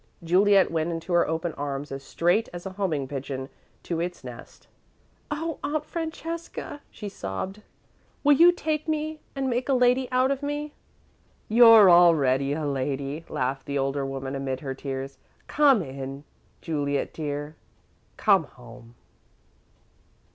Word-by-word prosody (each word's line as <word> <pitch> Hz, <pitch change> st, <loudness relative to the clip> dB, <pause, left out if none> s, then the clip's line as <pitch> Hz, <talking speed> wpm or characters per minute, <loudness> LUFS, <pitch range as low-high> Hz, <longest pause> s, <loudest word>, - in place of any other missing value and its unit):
Juliet 195 Hz, +3 st, +4 dB
went 160 Hz, 0 st, 0 dB
into 165 Hz, +2 st, -4 dB
her 175 Hz, -, +4 dB
open 160 Hz, +1 st, -2 dB
arms 140 Hz, 0 st, -5 dB
as 135 Hz, 0 st, -5 dB
straight 175 Hz, +10 st, +1 dB
as 175 Hz, +1 st, -8 dB
a 190 Hz, -, -4 dB
homing 180 Hz, -8 st, -2 dB
pigeon 135 Hz, -1 st, -5 dB, 0.3 s
to 170 Hz, -2 st, -3 dB
its 175 Hz, +1 st, -4 dB
nest. -, -, -11 dB, 0.6 s
"Oh, 320 Hz, +1 st, -3 dB
Aunt 300 Hz, +1 st, -2 dB
Francesca," 330 Hz, -2 st, -6 dB
she 210 Hz, -, -8 dB
sobbed, 190 Hz, -, -5 dB, 0.6 s
"will 290 Hz, 0 st, +6 dB
you 340 Hz, +5 st, +7 dB
take 310 Hz, -3 st, -2 dB
me 310 Hz, 0 st, -2 dB, 0.2 s
and 270 Hz, -1 st, -1 dB
make 250 Hz, +1 st, -1 dB
a 270 Hz, -, +4 dB
lady 250 Hz, +1 st, +3 dB
out 255 Hz, +1 st, +3 dB
of 275 Hz, 0 st, -2 dB
me?" 290 Hz, +1 st, -4 dB, 0.7 s
"You're 225 Hz, -2 st, +8 dB
already 140 Hz, -6 st, +5 dB
a 155 Hz, 0 st, -3 dB
lady," 140 Hz, +2 st, -3 dB
laughed 135 Hz, +1 st, -2 dB
the 140 Hz, 0 st, -2 dB
older 135 Hz, +1 st, -1 dB
woman 135 Hz, 0 st, -4 dB
amid 135 Hz, -1 st, -3 dB
her 135 Hz, -3 st, -4 dB
tears. 135 Hz, 0 st, -6 dB, 0.3 s
"Come 275 Hz, -9 st, +4 dB
in, 135 Hz, 0 st, -7 dB, 0.4 s
Juliet 145 Hz, -3 st, -2 dB
dear 145 Hz, 0 st, -4 dB, 0.6 s
come 195 Hz, -6 st, +4 dB
home!" 120 Hz, -2 st, -15 dB
165 Hz, 140 wpm, -26 LUFS, -, 0.7 s, You're